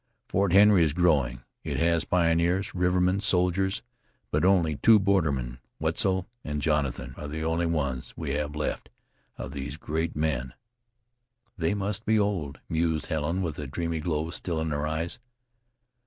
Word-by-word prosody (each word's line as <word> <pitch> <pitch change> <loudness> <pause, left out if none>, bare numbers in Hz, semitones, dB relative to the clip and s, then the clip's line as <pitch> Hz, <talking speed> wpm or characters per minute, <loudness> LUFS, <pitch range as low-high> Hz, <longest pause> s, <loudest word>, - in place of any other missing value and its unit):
Fort 100 -2 +1
Henry 100 -1 +7
is 75 -3 +1
growing; 70 -8 +2 0.2
it - - -3
has 85 0 +2
pioneers, 85 +2 +1
rivermen, 90 +1 +2
soldiers, 95 -1 +1 0.5
but - - +1
only 90 -6 +3
two 115 +7 +6
bordermen. 75 -12 0 0.2
Wetzel 95 -1 0 0.2
and 75 -1 -3
Jonathan 75 -3 -1
are 75 - -6
the 80 +2 -4
only 80 +1 0
ones 70 -6 -2
we 80 -4 -3
have 75 +1 -2
left 75 - -3 0.5
of - - -6
those 70 +2 -5
great 80 +1 -2
men." 65 -5 -1 1.0
"They 85 +2 0
must 100 +1 -2
be 110 -1 +2
old," 100 -9 -1
mused 80 -1 0
Helen, 80 +4 -1
with 80 -4 -4
a 75 - -4
dreamy 85 +3 -2
glow 80 0 -2
still 85 -2 -3
in 80 0 -2
her 75 +1 -1
eyes. 80 +5 -2
80 Hz, 155 wpm, -27 LUFS, 75-90 Hz, 1.0 s, Henry